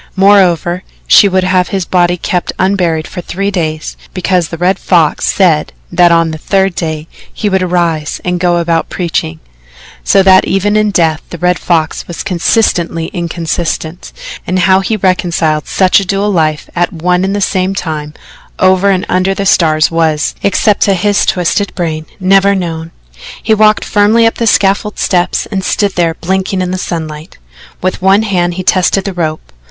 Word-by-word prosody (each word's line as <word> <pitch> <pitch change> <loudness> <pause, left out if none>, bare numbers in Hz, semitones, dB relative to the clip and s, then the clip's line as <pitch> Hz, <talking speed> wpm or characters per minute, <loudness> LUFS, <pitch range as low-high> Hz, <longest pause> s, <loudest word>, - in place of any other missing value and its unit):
Moreover, 185 -3 +3 0.2
she 205 - +6
would 185 0 +1
have 185 -1 +1
his 190 -3 -3
body 175 0 +1
kept 180 +1 -2
unburied 180 -5 0
for 180 - -7
three 195 +4 -3
days, 155 -4 -3 0.2
because 185 -2 0
the 165 - -7
Red 180 +3 0
Fox 165 -5 +1
said 165 -6 +1 0.2
that 175 0 +4
on 165 -1 +2
the 155 - -7
third 195 +2 0
day 160 -2 -4 0.2
he 210 - -2
would 190 -1 +1
arise 170 -4 -1
and 180 0 -1
go 175 -1 +1
about 165 -1 -1
preaching. 160 - -3 0.6
So 195 -1 +3
that 190 0 +5
even 205 +2 0
in 215 0 +2
death 165 -5 +1
the 170 - -7
Red 180 +1 0
Fox 165 -2 -1
was 175 - -6
consistently 170 -3 0
inconsistent, 170 -1 -4 0.4
and 185 - 0
how 190 0 +4
he 215 +3 -2
reconciled 170 -5 0
such 185 0 +3
a - - -3
dual 195 +2 -1
life 155 -4 0
at 175 0 0
one 180 +2 0
and 195 +1 -1
the - - -1
same 190 0 -1
time 150 -4 -5 0.4
over 185 +1 +3
and 185 -2 0
under 185 +1 0
the 200 - -3
stars 155 -4 +2
was, 160 -2 0
except 200 +1 +1
to 195 - +2
his 200 +2 +1
twisted 185 +3 0
brain, 160 -3 -3
never 195 +1 +3
known. 165 -3 -4 0.5
He 220 - +2
walked 215 0 +3
firmly 215 +3 +3
up 225 - +2
the 230 - 0
scaffold 200 +1 +1
steps 180 -1 0
and 190 -2 -2
stood 200 +2 0
there 170 -2 0
blinking 190 +2 -2
in 180 - -3
the 185 - -3
sunlight. 155 -3 -6 0.5
With 185 0 -2
one 195 +3 +3
hand 175 -4 -1
he 185 - -4
tested 185 +1 +1
the 195 - -3
rope. 155 -3 -4
180 Hz, 175 wpm, -12 LUFS, 165-195 Hz, 0.6 s, she